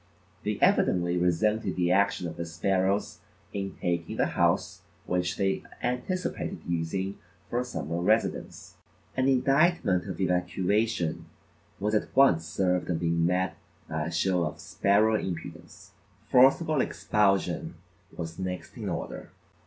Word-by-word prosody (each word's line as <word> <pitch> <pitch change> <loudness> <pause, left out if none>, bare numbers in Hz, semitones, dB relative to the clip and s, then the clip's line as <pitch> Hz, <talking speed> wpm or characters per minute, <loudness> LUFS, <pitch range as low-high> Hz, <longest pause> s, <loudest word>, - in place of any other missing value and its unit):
They 105 -1 -1
evidently 85 -1 +3
resented 90 +3 +1
the 90 -1 +1
action 100 -2 +2
of - - -7
the 85 - -4
sparrows 95 +4 0 0.3
in 95 -1 -4
taking 85 -2 -2
the - - +3
house - - +1 0.2
which 90 -1 -1
they 95 -1 0 0.2
anticipated 125 +10 -2
using 85 +4 -2 0.3
for 120 - +1
a - - 0
summer 85 - -4
residence. 110 +5 -1 0.4
An 130 0 +2
indictment 135 - +3
of 90 -4 -5
evacuation 90 +1 0 0.5
was 105 +2 -1
at 105 - -1
once 85 -12 +5
served 90 +1 0
and 85 -2 0
being 85 0 +1
met 90 +1 0 0.3
by 80 0 -2
a - - -4
show 90 +2 +1
of 75 -2 -4
sparrow 105 +3 +2
impudence, 90 +2 -7 0.4
forcible 135 +3 +5
expulsion 100 -5 0 0.4
was 80 +1 -6
next 90 -1 -5
in - - -4
order. - - -5
95 Hz, 130 wpm, -28 LUFS, 85-105 Hz, 0.5 s, once